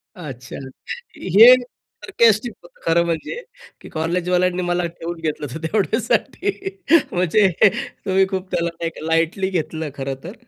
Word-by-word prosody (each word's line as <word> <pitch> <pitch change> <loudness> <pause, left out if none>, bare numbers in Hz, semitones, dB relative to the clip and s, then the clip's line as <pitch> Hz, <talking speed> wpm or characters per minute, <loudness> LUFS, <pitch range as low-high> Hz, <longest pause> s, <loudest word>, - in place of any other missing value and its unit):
अच्छा. 135 -8 -9 0.6
हे 215 +7 +8
सारकास्टिक 245 - 0
होतं - - -19
खरं 170 +1 +3
म्हणजे 170 - -3 0.4
की - - -11
कॉलेजवाल्यांनी 180 +2 0
मला 175 0 0
ठेवून 170 0 -7
घेतलं 150 -2 -3
होतं 160 +4 -7
तेवढ्यासाठी. 255 - -1 0.4
म्हणजे 185 +3 +3 0.6
तुम्ही 190 0 +3
खूप 190 -1 -4
त्याला 170 0 0 0.4
लाईटली 165 +4 +1
घेतलं 160 -3 -3
खरं 135 0 -4
तर. 180 - -7
180 Hz, 120 wpm, -21 LUFS, 165-210 Hz, 0.6 s, हे